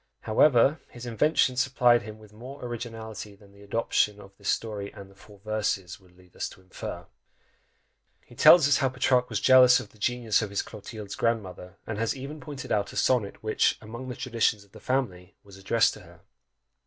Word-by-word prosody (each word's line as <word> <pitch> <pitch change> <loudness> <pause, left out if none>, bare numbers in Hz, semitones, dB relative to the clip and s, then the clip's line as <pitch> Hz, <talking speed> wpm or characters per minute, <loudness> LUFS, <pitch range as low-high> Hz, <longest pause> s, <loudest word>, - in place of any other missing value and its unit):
However, 135 +5 +4
his 120 0 -10
invention 130 +2 +2
supplied 125 -2 +3
him 110 +1 -9
with 105 -1 -17
more 125 +5 -10
originality 110 -3 -7
than 100 0 -20
the 100 0 -19
adoption 105 0 0
of 100 -1 -15
this 100 0 -5
story 105 -3 -2
and 100 -1 -12
the - - -20
four 105 +1 -17
verses 100 -4 -2
would 90 -2 -24
lead 90 -1 -22
us - - -3
to - - -16
infer. 95 0 -8 1.2
He - - -17
tells 165 -5 +7
us 145 - +4
how 135 - +1
Petrarch 125 0 +1
was - - -1
jealous 130 -1 +7
of 100 - -9
the 110 - -23
genius 115 0 +1
of 105 - -3
his 100 - -2
Clotilde's 105 -1 -9
grandmother, 95 -5 -3
and 110 -2 -5
has 115 +4 -1
even 140 +4 -7
pointed 145 -3 -8
out 105 -2 0
a - - -12
sonnet 115 -7 0
which, 110 0 +1
"among 120 +4 -8
the 125 - -5
traditions 115 -5 0
of 100 - -26
the 110 - -13
family," 100 -8 -3
was 100 -1 -15
addressed 110 +4 +2
to - - -11
her! - - -17
110 Hz, 195 wpm, -27 LUFS, 100-125 Hz, 1.2 s, tells